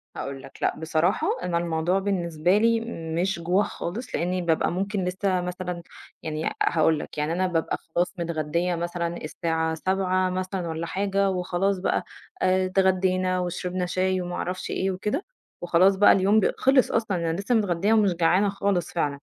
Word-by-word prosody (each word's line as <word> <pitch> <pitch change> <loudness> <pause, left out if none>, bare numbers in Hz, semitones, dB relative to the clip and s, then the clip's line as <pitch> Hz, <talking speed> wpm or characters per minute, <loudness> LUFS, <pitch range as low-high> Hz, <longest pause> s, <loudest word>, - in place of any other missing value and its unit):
هاقول 135 -1 -5
لك، - - -13
لأ - - +1
بصراحة 160 +4 +1 0.2
أنا 175 -1 0
الموضوع 170 +2 0
بالنسبة 180 -2 +1
لي 230 +1 +3 0.4
مش 190 -2 -1
جوع 180 +4 +2
خالص 210 +8 -5
لإنّي 180 +2 -1
بابقى 165 -2 +1
ممكن 195 +1 -2
لسّه 185 0 0
مثلًا 180 -1 -5 0.4
يعني 155 0 -3
أ - - 0
هاقول 160 -1 +3
لك، - - -8
يعني 150 +2 0
أنا 185 +2 +1
بابقى 165 -3 -1
خلاص 175 +2 -2
متغدّية 170 +1 -1
مثلًا 170 0 -3
الساعة 160 0 -2
19:00 185 +1 0
مثلًا 185 -1 -3
والّا 160 +1 -3
حاجة 195 0 0
وخلاص 185 +1 0
بقى 180 - 0 0.4
آآ 185 0 +3
اتغدّينا 185 -1 +2
وشربنا 180 0 -2
شاي 185 +1 0
وما 175 0 -4
أعرفش 185 +1 -4
إيه 190 +1 0
وكده 210 - -2 0.4
وخلاص 180 +3 +4
بقى 205 - +6
اليوم 200 +3 +4
ب 205 - +2
خِلِص 265 -1 +4
أصلًا، 220 -5 0
أنا 165 -1 -1
لسّه 200 +5 0
متغدّية 200 -1 +2
ومش 210 -4 +4
جعانة 180 +4 +3
خالص 195 -3 -1
فعلًا. 145 -4 -1
180 Hz, 170 wpm, -25 LUFS, 170-195 Hz, 0.4 s, بقى